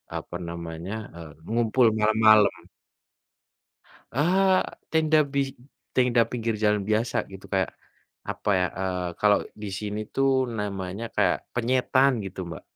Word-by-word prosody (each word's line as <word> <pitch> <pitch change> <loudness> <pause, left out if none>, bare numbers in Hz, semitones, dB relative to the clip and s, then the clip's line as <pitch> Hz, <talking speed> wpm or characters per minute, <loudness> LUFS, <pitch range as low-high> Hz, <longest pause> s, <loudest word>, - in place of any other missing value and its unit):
apa - - -6
namanya, 85 +2 -6 0.2
eee, 80 -3 -10
ngumpul 115 +2 +3
malam-malam. 105 -4 +4 1.4
Ah, 185 +7 +3 0.3
tenda 160 -1 +3 0.2
bis 140 -1 +1 0.5
tenda 125 -2 +4
pinggir 115 -2 -1
jalan 105 -1 +2
biasa 110 +3 0 0.2
gitu 95 0 -11
kayak, 95 -2 +1 0.6
apa - - -4
ya, 90 - +2
eee, 90 -1 -2
kalau 105 -1 +4 0.2
di - - -3
sini 105 0 -4
tuh 135 0 +2 0.3
namanya 100 0 -4
kayak - - +3 0.2
penyetan 130 +3 +3
gitu, 95 0 -8
Mbak. 80 - -7
110 Hz, 120 wpm, -26 LUFS, 95-125 Hz, 1.4 s, malam-malam